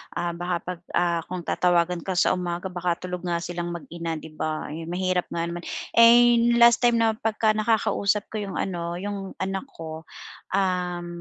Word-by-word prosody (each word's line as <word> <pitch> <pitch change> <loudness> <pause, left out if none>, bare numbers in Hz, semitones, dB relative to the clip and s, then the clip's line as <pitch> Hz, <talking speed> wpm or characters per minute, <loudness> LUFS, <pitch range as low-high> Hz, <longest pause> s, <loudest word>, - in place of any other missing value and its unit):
baka 175 +1 -2
'pag, 180 -1 -5 0.2
ah, 170 -1 +2
kung 180 -1 -5
tatawagan 175 0 +1
ka 185 - -1
sa - - +4
umaga 180 0 -3
baka 175 -1 -2
tulog 180 0 -4
nga 170 -1 -1
silang 175 0 -4
mag-ina, 170 -1 -5
'di 160 0 -9
ba? 155 0 -3
Ayun, 165 +1 -6
mahirap 180 0 -1
nga 170 - -3
naman. 170 +1 -4 0.3
Eh, 235 +1 +7 0.2
last 235 -1 +6
time 240 -1 +4
na 225 -1 +2
pagka 220 0 +1
nakakausap 215 -2 +1
ko 220 - -3
yung 195 - -6
ano 170 -2 -3
yung 195 +1 -5
anak 195 +7 -3
ko, 160 0 -8 0.5
um, 180 -2 -1
180 Hz, 170 wpm, -25 LUFS, 170-205 Hz, 0.5 s, Eh